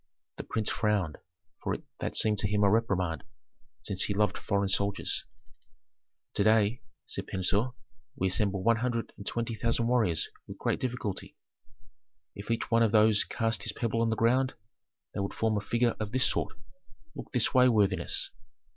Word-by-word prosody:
The - - -5
prince 110 -2 -2
frowned, 100 -8 0 0.4
for - - -1 0.2
that - - -3
seemed 105 -2 +3
to 100 - +1
him 105 0 +1
a 100 - +5
reprimand, 95 -7 +1 0.6
since 95 -2 0
he 100 - -2
loved 105 -2 +2
foreign 100 0 0
soldiers. 100 +1 -1 1.1
"To 100 - +2
day," 110 +2 +3 0.2
said - - -5
Pentuer, 100 +6 0 0.4
"we 95 -8 0
assemble 100 -1 0
one 115 0 +4
hundred 115 -1 -2
and 100 - -10
twenty 115 0 -2
thousand 115 +1 0
warriors 115 -9 +2 0.2
with - - -8
great - - -1
difficulty. 120 -6 -4 1.0
If 100 +2 -9
each 115 - -1
one 115 0 +4
of 115 -2 +4
those 110 -1 +5
cast 115 -1 -1
his - - -2
pebble 115 -1 -1
on 115 - +2
the 110 - +1
ground, 125 +4 +2 0.6
they - - -4
would 100 0 -3
form 110 -1 +1
a 105 - 0
figure 120 +3 +1
of 105 -1 -3
this 130 +1 +3
sort. - - -2 0.6
Look - - -9
this 125 - +2
way, 125 0 +6
worthiness." 100 -5 +1
110 Hz, 170 wpm, -29 LUFS, 100-115 Hz, 1.1 s, way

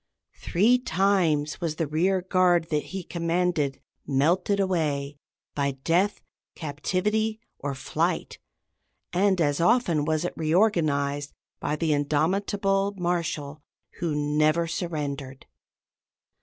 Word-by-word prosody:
Three 225 +8 +3
times 175 - +1
was 165 -3 -1
the 165 - -1
rear 180 +5 +1
guard 180 -3 +3
that 150 -1 0
he 190 -1 -6
commanded 170 -4 -1 0.3
melted 175 +9 +2
away 150 -7 -1 0.3
by 140 -1 0
death, 185 +5 +1 0.3
captivity, 200 +8 -1 0.2
or 140 -1 -3
flight, 130 - -2 0.7
and 190 +1 +2
as 145 -1 +1
often 175 -7 +3
was 155 +2 0
it - - -3
reorganized 155 -5 +1 0.3
by 150 - -1
the 155 -1 +1
indomitable 195 +7 +1
Marshal 165 -5 -2 0.4
who 165 -4 -1
"never 155 +3 +2
surrendered." 145 -6 -4
165 Hz, 105 wpm, -26 LUFS, 150-185 Hz, 0.7 s, Three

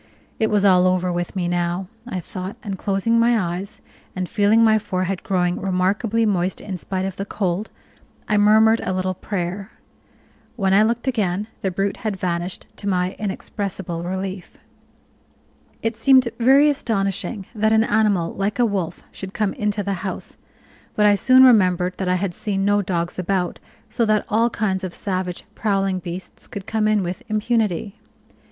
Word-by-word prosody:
It 220 - +2
was 205 -1 +2
all 185 -2 +5
over 185 -1 +1
with 175 +2 -3
me 180 -2 -1
now, 175 +1 -1 0.2
I 190 -6 -3
thought, 185 +4 -6
and 200 -4 -3
closing 200 +4 +1
my 235 0 +4
eyes, 180 +1 -4 0.3
and 185 -1 -2
feeling 210 +4 +3
my 220 -1 +5
forehead 185 -2 -2
growing 180 -2 0
remarkably 200 +5 +1
moist 190 -3 0
in 195 -3 -6
spite 185 +2 -3
of 190 -1 -5
the 195 - -2
cold, 200 0 -2 0.6
I 215 - +1
murmured 220 +2 +5
a - - -1
little 185 0 -1
prayer. 185 0 -4 0.8
When 195 -4 +1
I 200 - +6
looked 235 +4 0
again 210 -4 0
the 190 - 0
brute 195 +2 -1
had 215 -3 -3
vanished, 175 0 -3
to 205 - -6
my 185 -1 0
inexpressible 195 -4 -4
relief. 190 +1 -5 1.3
It 225 0 0
seemed 260 0 +5
very 270 +5 +6
astonishing 200 -6 -1
that 220 -1 +1
an 220 0 +5
animal 210 -6 +1
like 200 +2 -2
a 245 - +4
wolf 190 -6 -3
should 190 0 -8
come 210 -2 0
into 210 0 -1
the 200 0 -1
house; 190 -2 -5 0.6
but 210 - +3
I 205 - +6
soon 255 +6 +6
remembered 185 -7 +4
that 190 - -2
I 180 - +2
had 185 -1 -2
seen 195 0 -2
no 205 0 +3
dogs 175 -2 -2
about, 185 -1 -1 0.3
so 235 - -1
that 215 -1 +2
all 230 +3 +3
kinds 195 -4 -1
of 185 -2 -5
savage, 185 -2 -3
prowling 195 -4 0
beasts 180 +1 -7
could 200 -2 -7
come 220 -1 0
in 215 -2 +2
with 180 +5 -4
impunity. 215 -3 0
195 Hz, 170 wpm, -22 LUFS, 185-215 Hz, 1.3 s, I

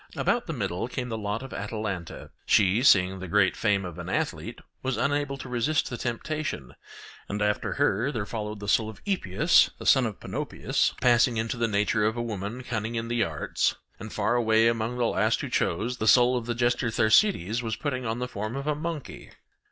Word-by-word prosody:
About 240 0 0
the 165 - -3
middle 95 - -2
came 125 0 -4
the 115 - -3
lot 105 +3 -3
of 135 - -9
Atalanta; 105 -5 -5 0.2
she, 105 +2 +4
seeing 95 -7 +4
the 95 - -6
great 95 +1 +3
fame 100 -3 +1
of 85 -3 -7
an - - -6
athlete, - - -3 0.2
was 130 -1 -2
unable 145 0 0
to 130 - -8
resist 125 +6 0
the - - -2
temptation: 120 - -4 0.6
and 105 - -3
after 105 0 0
her 120 +8 +1
there 110 -7 -3
followed 105 -1 -5
the 100 - -7
soul 110 +1 +2
of 110 - -11
Epeus 165 - +3
the - - -9
son 130 -3 +5
of 105 - -7
Panopeus - - -1
passing 120 -1 +4
into 110 +1 -1
the 120 -1 0
nature 105 +1 +1
of 110 +2 +1
a 120 - -1
woman 110 +2 -5
cunning 115 -1 -3
in 115 0 -3
the 120 -1 +1
arts; 80 -6 -1 0.2
and - - -8
far 120 - 0
away 110 -1 +3
among 115 +1 -1
the 120 - +1
last - - +1
who - - -4
chose, 120 +9 0
the 110 - -2
soul 125 +2 +6
of 120 -2 -3
the 120 - -1
jester 120 +1 +1
Thersites 110 - +3
was 110 -3 -2
putting 130 -2 -3
on 115 -1 -2
the 125 +1 -3
form 110 0 -5
of 140 0 -4
a 150 - +1
monkey. 155 -1 -6
115 Hz, 205 wpm, -27 LUFS, 105-125 Hz, 0.6 s, soul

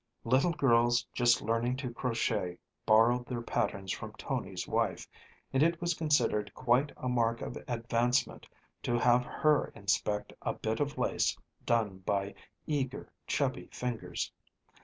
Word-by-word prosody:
Little 130 +8 +3
girls 120 -6 +3
just 120 0 +3
learning 115 +3 0
to 130 -4 -4
crochet 110 -7 -1 0.3
borrowed 120 +3 +5
their 120 -2 -3
patterns 100 -5 -1
from - - -5
Tony's - - -4
wife, - - 0 0.5
and 135 - +3
it 165 +1 +3
was 175 0 0
considered 145 -10 +1
quite 130 +3 +2
a 125 - -4
mark 115 -2 +1
of - - -5
advancement 120 +1 0 0.3
to 120 - 0
have 120 +1 +4
her 150 -1 +2
inspect 105 -1 -1
a - - -1
bit 110 0 -2
of 145 0 -1
lace - - +1 0.3
done 110 -5 +1
by 100 +1 -1 0.3
eager, 140 -3 -3
chubby 135 -3 -1
fingers. 125 -2 -3
120 Hz, 140 wpm, -31 LUFS, 115-130 Hz, 0.5 s, borrowed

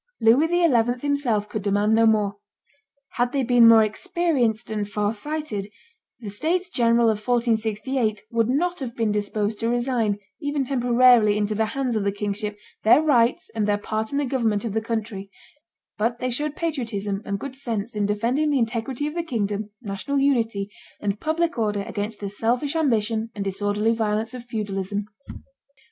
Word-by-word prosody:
Louis 235 +8 +5
XI. 250 -9 +2
himself 250 -8 0
could 210 0 -4
demand 205 +2 +1
no 225 0 +5
more. 210 -2 +2 0.8
Had 245 0 +1
they 275 -2 +1
been 245 -1 +6
more 225 -1 +8
experienced 235 -1 0
and 210 -1 -2
far 210 +1 0
sighted, 230 -4 -4 0.5
the 215 -4 -7
states 350 - -1
general 235 -1 +3
of 215 -2 +2
1468 225 0 0
would 230 -1 +1
not 350 +7 0
have 250 -4 -5
been 225 -2 0
disposed 210 +1 -1
to 230 - 0
resign, 240 -4 0 0.2
even 290 -2 -1
temporarily, 245 -4 +4
into 210 0 0
the 220 +1 0
hands 255 -4 0
of 215 - 0
the 200 - +1
kingship, 205 +1 -3 0.2
their 220 - +6
rights 255 -7 +2
and 215 -2 0
their 205 0 +2
part 215 +1 -3
in 280 - -1
the 290 - +1
government 235 -5 0
of 220 - -3
the 220 - 0
country; 220 -3 -4 0.7
but 230 +2 0
they 250 +1 -2
showed 295 +4 -2
patriotism 225 - -2
and 200 -1 -3
good 275 +2 -7
sense 230 -4 -4
in 205 -1 0
defending 235 +9 +1
the 290 - +2
integrity 240 +3 -1
of 300 - -3
the 340 - -1
kingdom, 210 -8 -2
national 200 +7 -3
unity, 230 -7 +1 0.3
and 205 0 -2
public 325 -2 -1
order 210 -2 0
against 205 +1 -4
the 200 - -4
selfish 240 +9 -1
ambition 225 -7 +1
and 205 - -3
disorderly 205 +3 0
violence 220 +1 -1
of 250 -2 -7
feudalism. 205 -3 -3
225 Hz, 170 wpm, -24 LUFS, 210-255 Hz, 0.8 s, more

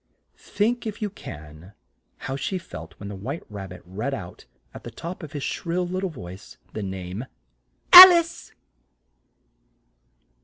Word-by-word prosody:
Think, 230 +3 -2
if 210 - -6
you 210 -2 -4
can, 75 - -12 0.4
how 135 - -6
she 140 +8 -3
felt 80 - -11
when 100 - -8
the 100 - -7
White 130 - -6
Rab 100 -2 -8
bit 90 -1 -12
read 110 +10 -4
out, 90 -8 -11 0.3
at - - -11
the - - -8
top 175 +3 -8
of 155 -2 -10
his 145 -2 -5
shrill 180 +1 -3
lit 185 +1 -4
tle 190 - -2
voice, 95 - -12 0.2
the 110 - -5
name 95 +3 -6 0.7
"Al 370 +1 +14
ice!" 335 -1 -1
135 Hz, 155 wpm, -23 LUFS, -, 0.7 s, Al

